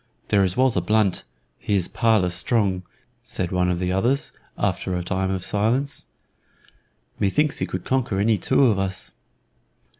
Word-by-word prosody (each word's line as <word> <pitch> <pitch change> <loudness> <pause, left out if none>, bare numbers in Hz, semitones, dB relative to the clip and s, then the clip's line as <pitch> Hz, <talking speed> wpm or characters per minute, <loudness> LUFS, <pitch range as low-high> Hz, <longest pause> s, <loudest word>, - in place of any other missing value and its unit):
"There 100 -2 +4
is 95 +2 0
Walter 130 -1 +3
Blunt; 105 - +1 0.3
he 105 - -1
is 90 -3 +1
parlous 110 -7 +2
strong," 95 0 +1 0.4
said 90 -2 -3
one 90 -1 +1
of 90 - 0
the 90 +1 -1
others, 120 +9 +1 0.3
after 95 - -1
a 90 - -2
time 95 +1 -1
of 95 -2 -2
silence. 120 +7 0 1.1
"Methinks 145 +9 +1
he - - -1
could - - -5
conquer 125 -7 0
any 105 0 +2
two 135 - +3
of 110 -6 +3
us." 95 -1 -4
100 Hz, 155 wpm, -23 LUFS, 90-115 Hz, 1.1 s, There